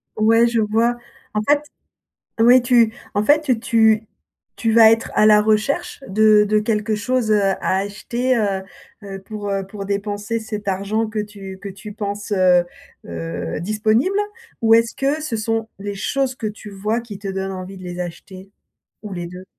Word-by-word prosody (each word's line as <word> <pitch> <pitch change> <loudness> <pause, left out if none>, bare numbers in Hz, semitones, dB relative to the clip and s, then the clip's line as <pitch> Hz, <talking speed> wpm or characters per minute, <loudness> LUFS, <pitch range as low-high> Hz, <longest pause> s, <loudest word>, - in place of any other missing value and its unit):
Ouais, 225 +2 +4
je 230 -1 +1
vois. 225 +3 +1 0.4
En 210 - 0
fait 290 0 +4 0.8
oui, 245 +2 +6
tu 235 -3 +3 0.2
en 205 - +2
fait, 290 -3 +2
tu 220 -3 +3 0.5
tu 225 -1 0
vas 225 -1 +8
être 225 0 +1
à 215 - +4
la 210 -1 +7
recherche 245 +11 0
de 215 +1 +5
de 215 - +3
quelque 215 0 0
chose, 225 +1 -1
heu, 210 - +4 0.2
à - - 0
acheter, 235 +5 -1
heu 200 -3 0 0.4
heu, 195 -1 -8
pour, 210 -1 -6
heu, 195 -1 -2
pour 200 0 -7
dépenser 205 +2 -2
cet 215 -2 -6
argent 200 +4 -1
que 220 0 -5
tu 200 -2 -8
que 200 - -5
tu 205 +2 -9
penses, 205 0 -5
heu 180 -2 +4 0.4
heu, 85 - -5
disponible? 220 - +1 0.4
Ou 225 0 +6
est-ce 230 0 +3
que 285 +3 0
ce 245 -7 -3
sont 225 +1 -2
les 205 0 -5
choses 265 +6 -1
que 230 - -5
tu 210 0 -10
vois 210 +4 -2
qui 215 -4 -9
te 200 -1 -6
donnent 195 0 -3
envie 185 +1 -7
de 185 - -11
les 180 0 -6
acheter? 185 +2 -8 0.5
Ou 210 -2 -7
les 175 -1 -5
2? 180 +2 -10
215 Hz, 180 wpm, -20 LUFS, 195-230 Hz, 0.8 s, vas